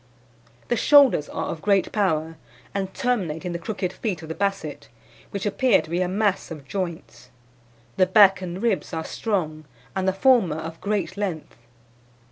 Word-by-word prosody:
"The 240 - +2
shoulders 270 - +5
are - - -4
of 160 - -5
great 200 0 +2
power, 165 -6 0 0.4
and 195 -1 -2
terminate 190 - -2
in 180 - -2
the 170 - -4
crooked 190 0 -3
feet 185 -8 -4
of 160 - -9
the - - -2
Basset, 195 -6 -3 0.4
which 200 0 -4
appear 225 +2 +3
to - - -8
be 175 +2 0
a 180 - +1
mass 200 +1 0
of 150 -4 -9
joints. 170 -7 -5 0.7
The 185 - +4
back 195 0 +6
and 185 +2 -5
ribs 225 -5 0
are 160 - -3
strong, 155 -8 -2 0.3
and 190 0 -1
the 190 - +3
former 195 - +3
of 160 +1 -7
great 200 -3 -2
length. 185 -7 -4
185 Hz, 170 wpm, -24 LUFS, 160-205 Hz, 0.7 s, back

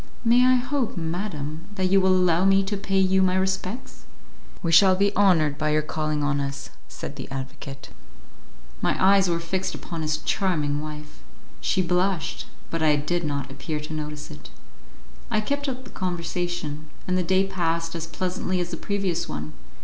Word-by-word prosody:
"May 240 +2 +6
I 255 0 +6
hope, 250 -3 -1
madam, 165 -2 -3
that 185 -2 0
you 195 0 +6
will 185 0 +4
allow 180 -1 +3
me 195 0 +5
to 200 +2 -2
pay 195 -1 -1
you 190 0 +4
my 185 -1 +3
respects?" 190 +4 -2 0.6
"We 165 - +1
shall 185 +3 +7
be 200 +2 +2
honoured 160 -7 +4
by 155 - +1
your 155 0 +2
calling 155 -1 -1
on 145 -1 +1
us," 140 0 -5 0.2
said 140 - -7
the 135 - -7
advocate. 135 0 -7 0.9
My - - +1
eyes 195 -1 +5
were 170 -1 +1
fixed 185 +3 -2
upon 165 -2 -6
his 155 0 0
charming 150 -5 0
wife. 150 0 -8 0.4
She 190 - +1
blushed, 180 0 0 0.2
but 165 - -2
I 155 -1 +5
did 175 +4 -1
not 140 -3 -2
appear 150 +3 -4
to 150 +1 -6
notice 150 -1 -5
it. - - -11 0.8
I 215 - +2
kept 285 +6 -1
up 260 0 -5
the 250 - -12
conversation, 175 -4 -3 0.2
and 185 - +1
the 185 - +2
day 190 +2 +3
passed 165 -3 -1
as 165 -1 -4
pleasantly 185 +2 -2
as 175 0 -2
the 165 - -3
previous 195 -4 -1
one. 75 +1 -5
175 Hz, 180 wpm, -25 LUFS, 155-190 Hz, 0.9 s, shall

